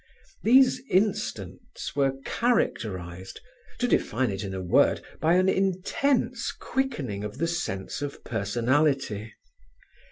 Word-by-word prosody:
These 255 +2 +5
instants 190 - -2
were 135 -2 +2
characterized—to 110 - -2
define 125 - +1
it 95 0 -4
in 95 -1 -4
a - - -3
word—by 155 - +2
an 185 +1 +3
intense 200 +7 +1
quickening 145 - -3
of 105 +3 -6
the 165 +3 0
sense 145 - -3
of 145 -1 -5
personality. 120 +1 0
140 Hz, 100 wpm, -27 LUFS, -, -, These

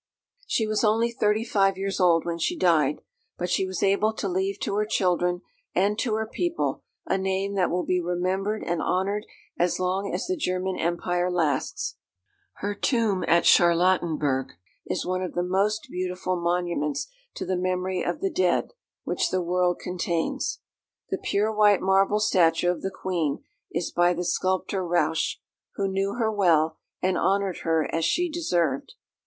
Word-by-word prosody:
She 220 - +1
was 215 +1 0
only 225 +2 +3
thirty 215 -1 +1
five 195 -4 +2
years 195 0 -2
old 170 -3 +4
when 170 -1 -3
she 350 - 0
died; 155 - +2 0.4
but 180 0 -3
she 190 - +1
was 185 -2 -3
able 200 +2 +3
to 210 - -3
leave 190 +2 -1
to - - -1
her 210 - +2
children 180 -3 +1 0.3
and 205 +3 +2
to 225 -5 0
her 220 0 -1
people 340 +9 -2 0.2
a 255 - 0
name 190 +1 -1
that 190 -3 +1
will 180 +1 0
be 180 -1 +1
remembered 185 +4 -1
and 170 -1 -1
honoured 200 +3 -1 0.3
as 175 0 +1
long 190 +2 -1
as 180 - -2
the 370 - -1
German 185 - -1
Empire 175 +1 0
lasts. 160 -7 -1 0.6
Her 205 +1 -3
tomb 215 -3 +1
at 170 +1 +4
Charlottenburg 165 -6 +3 0.3
is - - -2
one 185 0 -1
of 185 - -4
the 175 - 0
most 200 +4 0
beautiful 185 0 -2
monuments 170 -4 -1 0.3
to - - -4
the 185 - -1
memory 185 0 -1
of 175 - -2
the 195 - 0
dead, 180 -2 +1 0.3
which - - 0
the 185 -1 0
world 180 0 +1
contains. 175 -2 -2 0.5
The - - -1
pure 210 +2 0
white 210 -2 +5
marble 195 +2 +3
statue 175 -4 +3
of 180 - -5
the 190 - -2
Queen 175 -6 -2 0.3
is 170 +1 -2
by 175 0 +3
the 175 +1 -3
sculptor 185 +2 0
Rauch, 170 -2 +1 0.4
who 195 - 0
knew 195 +2 -1
her 225 -2 +1
well, 165 -6 +2 0.2
and 185 0 +1
honoured 195 -2 +1
her 160 -1 +1
as 165 - 0
she 350 - +1
deserved. 175 - -1
185 Hz, 170 wpm, -26 LUFS, 175-200 Hz, 0.6 s, white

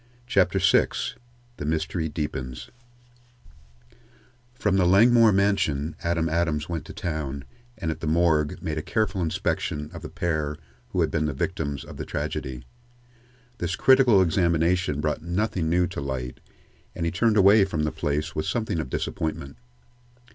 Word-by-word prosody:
CHAPTER - - +2
VI - - +4 0.7
THE - - -5
MYSTERY 80 +1 -1
DEEPENS 65 -5 -5 1.8
From 105 -5 +1
the 90 -2 +3
Langmore 115 +4 +6
mansion 90 -7 +1
Adam 85 -1 0
Adams 80 -1 0
went 85 -2 -4
to 100 - -9
town, 75 - -4 0.3
and 80 -6 -2
at - - -6
the 80 - -4
morgue 80 -2 +2
made 80 -1 -2
a - - -3
careful 110 +1 -1
inspection 75 -2 -2
of - - -8
the - - -7
pair 75 -3 -2 0.3
who - - 0
had - - +1
been 80 -2 0
the 75 - -1
victims 75 -2 -3
of - - -11
the - - -5
tragedy. 65 -2 -4 0.9
This 90 0 -1
critical 125 -6 +5
examination 85 -2 +1
brought 75 0 -1
nothing 85 0 -1
new 90 +2 +3
to 85 - -5
light, 65 -2 -4 0.6
and 85 - -2
he 85 - 0
turned 110 +4 +2
away 100 +1 +7
from 85 -5 -1
the 75 - 0
place 75 +1 -2
with 75 - -2
something 110 -8 -1
of 75 - -4
disappointment. 70 -1 -3
80 Hz, 155 wpm, -25 LUFS, 75-95 Hz, 1.8 s, away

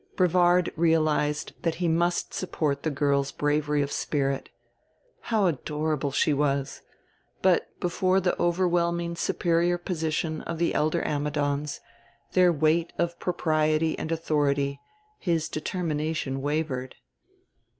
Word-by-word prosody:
Brevard 180 -1 +3
realized 155 -2 +1
that 165 -2 0
he 175 +1 -1
must 170 +2 +1
support 150 -6 -1
the 160 - -1
girl's 140 -1 +1
bravery 150 0 +1
of 140 - -4
spirit. 135 -2 -1 0.7
How 220 -4 +1
adorable 150 -2 -1
she 150 +2 +2
was! 140 -1 -1 0.6
But, 185 -2 +2
before 185 +2 +1
the 180 -1 0
overwhelming 170 -1 +1
superior 170 +1 +1
position 160 -2 -2
of 170 - -5
the 170 +1 +1
elder 155 +1 +1
Ammidons, 145 0 -1 0.5
their 180 -1 +5
weight 160 +2 +2
of 170 0 -1
propriety 155 -2 +1
and 160 - -4
authority, 145 -3 0 0.4
his 165 -4 0
determination 155 -4 -2
wavered. 145 -3 -2
160 Hz, 115 wpm, -26 LUFS, 145-170 Hz, 0.7 s, their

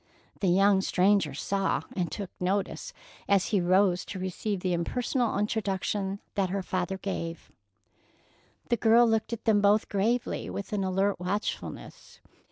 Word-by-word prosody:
The 195 - 0
young 195 +2 +4
stranger 190 -6 +2
saw 195 +6 -1
and 175 -4 -1
took 200 -3 -5
notice 195 - -2 0.4
as 200 -2 +3
he 200 -4 +2
rose 185 +1 +3
to 195 - -6
receive 185 +2 -3
the 180 -1 0
impersonal 240 +8 0
introduction 200 -1 -1
that 195 -3 0
her 195 +1 -2
father 185 +1 -2
gave. 170 -4 -5 1.2
The 240 - +2
girl 230 +2 +5
looked 225 0 0
at 230 -1 -5
them 210 -2 +4
both 205 +1 +3
gravely, 220 +5 0
with 200 +1 -6
an 200 -2 0
alert 195 +1 0
watchfulness. 190 +4 -5
195 Hz, 145 wpm, -28 LUFS, 185-210 Hz, 1.2 s, girl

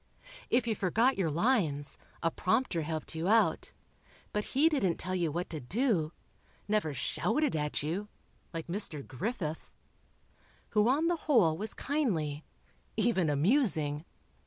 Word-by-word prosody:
If 245 0 +3
you 230 - +1
forgot 225 +7 +2
your 175 -4 +2
lines, 155 - +1 0.2
a 165 - +2
prompter 185 -2 +1
helped 155 +1 -4
you 165 +2 -2
out, 225 +2 +3 0.6
but 210 - 0
he 305 +4 +6
didn't 230 - +1
tell 185 - -4
you 170 -4 0
what 175 +4 -2
to 155 - -3
do... 175 - 0 0.6
never 210 -7 +1
shouted 220 - 0
at 150 -1 -1
you, 180 +7 -2 0.4
like 165 -2 -5
Mr. 170 -5 -2
Griffith, 160 - -4 1.0
who 210 +2 +3
on 290 +5 +2
the 345 +1 +2
whole 195 - +5
was 215 +6 -3
kindly... 165 - -1 0.5
even 190 -9 +2
amusing. 155 - +2
185 Hz, 135 wpm, -31 LUFS, 155-230 Hz, 1.0 s, he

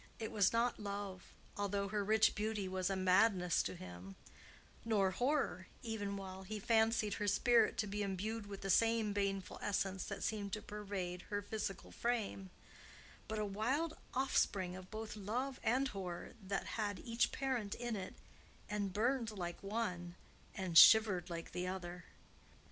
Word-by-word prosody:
It 220 - -4
was 200 -3 +4
not 235 +1 +1
love, 200 -2 -5 0.3
although 200 -1 -1
her 205 0 0
rich 220 +2 +4
beauty 210 -2 -2
was 185 0 -1
a 195 - 0
madness 185 -1 +4
to - - -3
him; 90 - -9 0.7
nor 205 -4 +2
horror, 245 -6 0 0.2
even 205 -3 -3
while 190 -1 -7
he 215 +3 -5
fancied 220 0 +3
her 205 - -2
spirit 235 +4 +4
to 220 - +1
be 205 +1 -3
imbued 205 +2 -2
with 200 -1 -7
the 195 - 0
same 225 -1 +3
baneful 195 -2 -2
essence 195 -2 -1
that 200 - -5
seemed 205 -3 -2
to 215 - -2
pervade 195 -4 -4
her 205 0 -2
physical 200 -2 -4
frame; 220 -5 -2 0.8
but 220 - -3
a 215 - 0
wild 260 +11 0 0.2
offspring 195 -8 +1
of 185 0 -10
both 220 -1 -5
love 245 +6 -3
and 260 +4 +2
horror 185 -5 -5
that 195 0 -2 0.2
had 205 -2 -1
each 230 +5 0
parent 255 -7 -1
in 240 -1 -3
it, 190 -2 -5 0.5
and 205 -2 -2
burned 235 +2 +1
like 175 -5 -5
one 190 -5 -3 0.4
and 180 -4 +5
shivered 205 -4 +7
like 170 -1 -5
the 180 +1 -3
other. 180 -2 -5
205 Hz, 160 wpm, -37 LUFS, 190-220 Hz, 0.8 s, shivered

